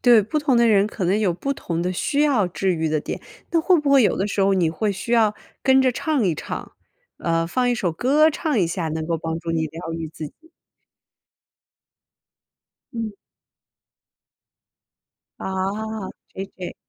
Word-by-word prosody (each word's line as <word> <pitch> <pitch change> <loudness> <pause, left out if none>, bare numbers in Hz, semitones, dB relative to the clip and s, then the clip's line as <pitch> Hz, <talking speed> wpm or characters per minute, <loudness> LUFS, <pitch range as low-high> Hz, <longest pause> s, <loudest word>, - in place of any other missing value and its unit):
对， 240 -3 +7
不 225 +10 -1
同 290 -4 +2
的 235 0 +5
人 200 -2 +4
可 215 -3 -4
能 190 +4 +2
有 205 -5 +2
不 275 +11 -2
同 170 -9 -3
的 180 +1 -1
需 280 +10 0
要 275 -10 +3
治 185 +1 0
愈 160 -1 -1
的 155 -1 0
点， - - -5 0.3
但 335 - +3
会 360 0 +4
不 290 -1 0
会 275 -2 +7
有 210 - +2
的 195 - 0
时 200 -1 -2
候 195 0 +4
你 180 -4 +2
会 205 +6 -1
需 200 +4 -4
要 220 -3 +4 0.3
跟 265 0 +5
着 260 -1 +3
唱 295 -1 0
一 175 -4 +2
唱， - - -6 0.5
呃， 165 -1 0
放 250 +8 +1
一 - - +2
首 185 -7 -1
歌 280 - +4
唱 300 -4 -1
一 180 - +3
下， 165 -1 -2
能 160 0 -3
够 165 0 0
帮 160 0 -3
助 165 0 -5
你 160 -1 0
疗 165 +2 -7
愈 165 -1 -4
自 155 0 -7
己？ 320 - -18 2.4
嗯。 225 -2 -3 2.3
啊 195 +2 -3 0.2
，JJ。 190 -1 -7
200 Hz, 195 characters per minute, -23 LUFS, 170-250 Hz, 2.4 s, 对